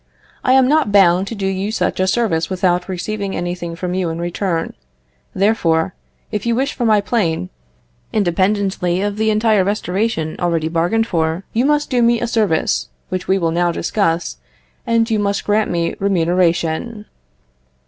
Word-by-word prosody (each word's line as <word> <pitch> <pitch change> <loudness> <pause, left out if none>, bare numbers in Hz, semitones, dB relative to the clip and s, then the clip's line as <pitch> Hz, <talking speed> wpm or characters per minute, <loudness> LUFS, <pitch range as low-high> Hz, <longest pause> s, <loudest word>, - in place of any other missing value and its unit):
I 255 - +3
am 260 -1 +5
not 300 -6 +2
bound 190 -1 +4
to 230 - -5
do 200 -2 -3
you 195 +2 -1
such 220 - -1
a 185 - +2
service 185 -6 0
without 180 -1 0
receiving 195 +2 -3
anything 175 -1 -4
from 180 +1 -4
you 185 -2 -1
in 165 - -4
return: 175 0 -2 0.6
therefore, 180 -4 +1 0.4
if 210 -2 -2
you 235 -1 +1
wish 270 +4 0
for 245 - -2
my 215 -2 +4
plane, 170 - -1 0.6
independently 190 -1 0
of 205 0 -2
the 220 0 +1
entire 215 -2 +3
restoration 195 -3 -1
already 165 -2 0
bargained 175 +8 +1
for, 165 -2 -1
you 240 +3 +2
must 295 0 +1
do 245 -1 +2
me 235 0 +3
a 240 - -1
service 215 -9 0 0.2
which 185 0 -4
we 190 - +3
will 165 -3 0
now 175 +1 +1
discuss; 170 -1 -1 0.5
you 230 -1 +2
must 200 0 -1
grant 210 +1 +1
me 170 -1 -1
remuneration. 180 +2 0
195 Hz, 160 wpm, -18 LUFS, 175-220 Hz, 0.6 s, am